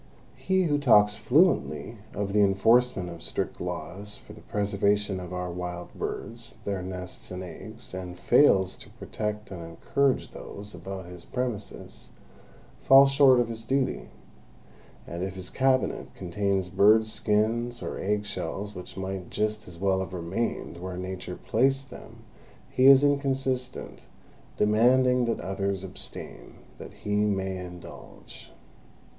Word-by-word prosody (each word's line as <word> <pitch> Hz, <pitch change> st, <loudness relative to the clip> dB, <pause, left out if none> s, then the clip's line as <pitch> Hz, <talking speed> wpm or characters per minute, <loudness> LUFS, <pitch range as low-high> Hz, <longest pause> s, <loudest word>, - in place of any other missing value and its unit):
He 190 Hz, 0 st, +1 dB
who 145 Hz, -4 st, +1 dB
talks 105 Hz, -7 st, +5 dB
fluently 120 Hz, -, +2 dB, 0.2 s
of 100 Hz, -1 st, -2 dB
the 105 Hz, -, +4 dB
enforcement 100 Hz, +1 st, +3 dB
of 85 Hz, -1 st, -8 dB
strict -, -, -3 dB
laws 105 Hz, +3 st, -5 dB
for -, -, -14 dB
the -, -, -13 dB
preservation 100 Hz, -1 st, 0 dB
of 90 Hz, -1 st, -8 dB
our 90 Hz, -1 st, -3 dB
wild 90 Hz, 0 st, -6 dB
birds, 115 Hz, 0 st, -5 dB
their 100 Hz, -2 st, -2 dB
nests 90 Hz, 0 st, -7 dB
and 90 Hz, 0 st, -5 dB
eggs, 110 Hz, +7 st, -9 dB
and 90 Hz, -1 st, -6 dB
fails 95 Hz, -3 st, +4 dB
to -, -, -13 dB
protect 105 Hz, -1 st, -5 dB
and 90 Hz, -3 st, -6 dB
encourage 135 Hz, +11 st, 0 dB
those 105 Hz, +1 st, -9 dB
about 95 Hz, -2 st, -7 dB
his 90 Hz, -1 st, -10 dB
premises, 120 Hz, -5 st, -5 dB, 0.7 s
falls 135 Hz, 0 st, +7 dB
short 135 Hz, -3 st, +6 dB
of 120 Hz, -, +2 dB
his 115 Hz, -1 st, -6 dB
duty; 135 Hz, +2 st, -1 dB, 1.0 s
and 85 Hz, +1 st, -6 dB
if 95 Hz, 0 st, -3 dB
his 95 Hz, -1 st, -6 dB
cabinet 130 Hz, -1 st, +1 dB
contains 95 Hz, 0 st, -1 dB
bird 110 Hz, +4 st, +5 dB
skins 110 Hz, +3 st, 0 dB
or -, -, -4 dB
egg 105 Hz, +1 st, 0 dB
shells 100 Hz, +1 st, -4 dB
which 90 Hz, -1 st, -9 dB
might 95 Hz, -1 st, -4 dB
just 105 Hz, 0 st, -2 dB
as 90 Hz, -2 st, -10 dB
well 95 Hz, +1 st, +1 dB
have 95 Hz, -1 st, -4 dB
remained 85 Hz, 0 st, -3 dB
where 90 Hz, +1 st, -6 dB
Nature 90 Hz, -1 st, -5 dB
placed 135 Hz, +3 st, +1 dB
them, -, -, -12 dB, 0.5 s
he 130 Hz, +1 st, +4 dB
is 135 Hz, 0 st, +9 dB
inconsistent, 135 Hz, -3 st, 0 dB, 0.6 s
demanding 125 Hz, +4 st, +4 dB
that 115 Hz, -, -1 dB
others 95 Hz, +1 st, -2 dB
abstain 95 Hz, -1 st, -8 dB, 0.2 s
that -, -, -9 dB
he 105 Hz, 0 st, -3 dB
may 95 Hz, -2 st, 0 dB
indulge. 90 Hz, -1 st, -11 dB
105 Hz, 140 wpm, -27 LUFS, 95-120 Hz, 1.0 s, is